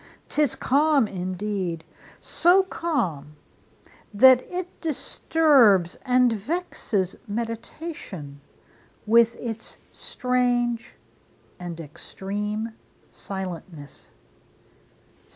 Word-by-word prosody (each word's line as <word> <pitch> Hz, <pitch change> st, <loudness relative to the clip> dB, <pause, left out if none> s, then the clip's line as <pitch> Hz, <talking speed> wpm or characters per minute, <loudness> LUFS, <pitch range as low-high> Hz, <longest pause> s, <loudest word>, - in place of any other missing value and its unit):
'Tis 295 Hz, -5 st, +1 dB
calm 285 Hz, -2 st, +3 dB
indeed! 185 Hz, -2 st, -3 dB, 0.4 s
so 360 Hz, +3 st, +4 dB
calm, 190 Hz, -, -2 dB, 0.8 s
that 255 Hz, +4 st, +7 dB
it 360 Hz, 0 st, -5 dB
disturbs 275 Hz, -, +3 dB
And 250 Hz, -2 st, +3 dB
vexes 215 Hz, -, -2 dB
meditation 225 Hz, -, -6 dB, 0.6 s
with 230 Hz, +1 st, +5 dB
its 225 Hz, -2 st, -7 dB
strange 245 Hz, -2 st, -1 dB, 0.6 s
And 175 Hz, -2 st, -6 dB
extreme 205 Hz, +7 st, -5 dB, 0.4 s
silentness. 180 Hz, -6 st, -8 dB
225 Hz, 65 wpm, -25 LUFS, 185-265 Hz, 0.8 s, that